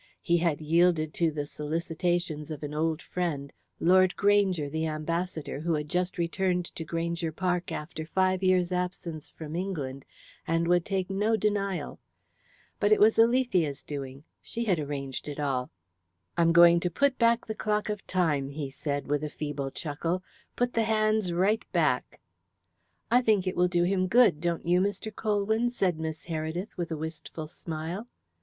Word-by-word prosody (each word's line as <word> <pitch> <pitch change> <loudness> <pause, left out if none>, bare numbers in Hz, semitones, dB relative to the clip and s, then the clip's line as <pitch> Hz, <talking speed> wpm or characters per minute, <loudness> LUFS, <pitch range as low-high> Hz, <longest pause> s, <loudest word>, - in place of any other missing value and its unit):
He 170 -1 +3
had 165 -3 0
yielded 160 0 +3
to 170 -2 +2
the 150 -1 -3
solicitations 165 +1 -2
of 155 -1 -6
an 145 0 -4
old 160 +1 -1
friend 150 -6 -3 0.3
Lord 185 +1 +4
Granger, 200 -6 +3
the 160 +2 -2
ambassador, 160 0 -3
who 165 +1 0
had 150 0 -3
just 180 +2 -1
returned 180 +1 0
to 165 - -5
Granger 165 0 -2
Park 180 +1 -1
after 155 0 -5
five 185 +1 +1
years' 185 -1 +3
absence 180 -3 -3
from 155 0 -8
England, 150 -8 -3 0.4
and 165 +1 +1
would 175 -1 +3
take 190 -1 -2
no 210 +3 +2
denial. 200 -3 -1 0.8
But 205 0 +2
it 215 - +6
was 220 +2 +5
Alethea's 210 - +3
doing 140 -1 -6 0.2
she 235 0 -4
had 185 -6 +2
arranged 140 -2 -4
it 145 0 -5
all. 135 -3 -1 0.7
"I'm 165 0 +4
going 170 0 +7
to 180 - -1
put 280 +7 +1
back 235 0 +3
the 220 - -3
clock 210 -1 -1
of 210 -2 -4
Time," 150 -7 +1
he 140 -1 -5
said, 145 0 -3
with 145 +1 0
a 150 - -2
feeble 145 -2 -4
chuckle. 165 +5 -3 0.3
"Put 245 0 0
the 225 -1 +2
hands 215 -3 +2
right 195 +6 +2
back." 150 -7 +1 0.9
"I 245 +1 +6
think 215 -6 +2
it 185 - -1
will 180 +1 +3
do 175 -1 +2
him 185 +1 +1
good, 210 -8 +5
don't 170 -1 -1
you, 175 +1 +3
Mr. 205 +2 -2
Colwyn?" 220 +2 +1
said 185 -9 0
Miss 160 0 -4
Heredith 165 +4 -4
with 175 -1 -3
a 160 - -3
wistful 160 0 -6
smile. 165 +7 -5
175 Hz, 170 wpm, -28 LUFS, 155-190 Hz, 0.9 s, going